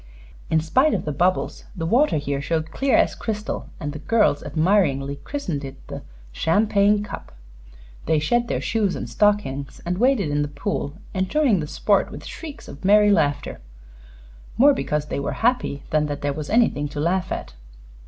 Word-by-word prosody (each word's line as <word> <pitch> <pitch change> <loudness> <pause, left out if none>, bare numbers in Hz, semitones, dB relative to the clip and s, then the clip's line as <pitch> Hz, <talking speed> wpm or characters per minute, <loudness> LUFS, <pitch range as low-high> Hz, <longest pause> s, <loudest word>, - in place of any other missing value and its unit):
In 160 -1 +3
spite 260 - +3
of - - -3
the 150 - -1
bubbles, 180 +6 0
the 165 - -3
water 245 - +3
here 140 -1 -2
showed 160 +1 -2
clear 270 +6 +2
as - - +3
crystal, 215 -1 -4
and 145 -4 -4
the 150 - -7
girls 210 -5 +2
admiringly 155 -6 +1
christened 170 - -4
it 135 0 -7
the - - -6 0.3
"Champagne 205 - +2
Cup." 210 - -8 0.8
They 160 - +3
shed 235 +11 +1
their - - -2
shoes 210 -4 0
and - - -5
stockings 205 -10 0
and 180 +2 -2
waded 240 - +2
in 145 0 +1
the 145 - 0
pool, 145 -1 -3 0.2
enjoying 200 - +2
the 150 - -3
sport - - +1
with - - -9
shrieks 310 -4 -9
of 140 - -11
merry 210 +2 +5
laughter 145 - 0 1.0
more 280 +4 +7
because 150 - -2
they 150 - -3
were 140 - -2
happy 245 - +1
than 150 -1 +2
that 145 -1 -5
there 145 -1 0
was 150 0 -6
anything 220 -10 +2
to 145 - -6
laugh 180 +4 0
at. - - -5
170 Hz, 175 wpm, -23 LUFS, 145-210 Hz, 1.0 s, more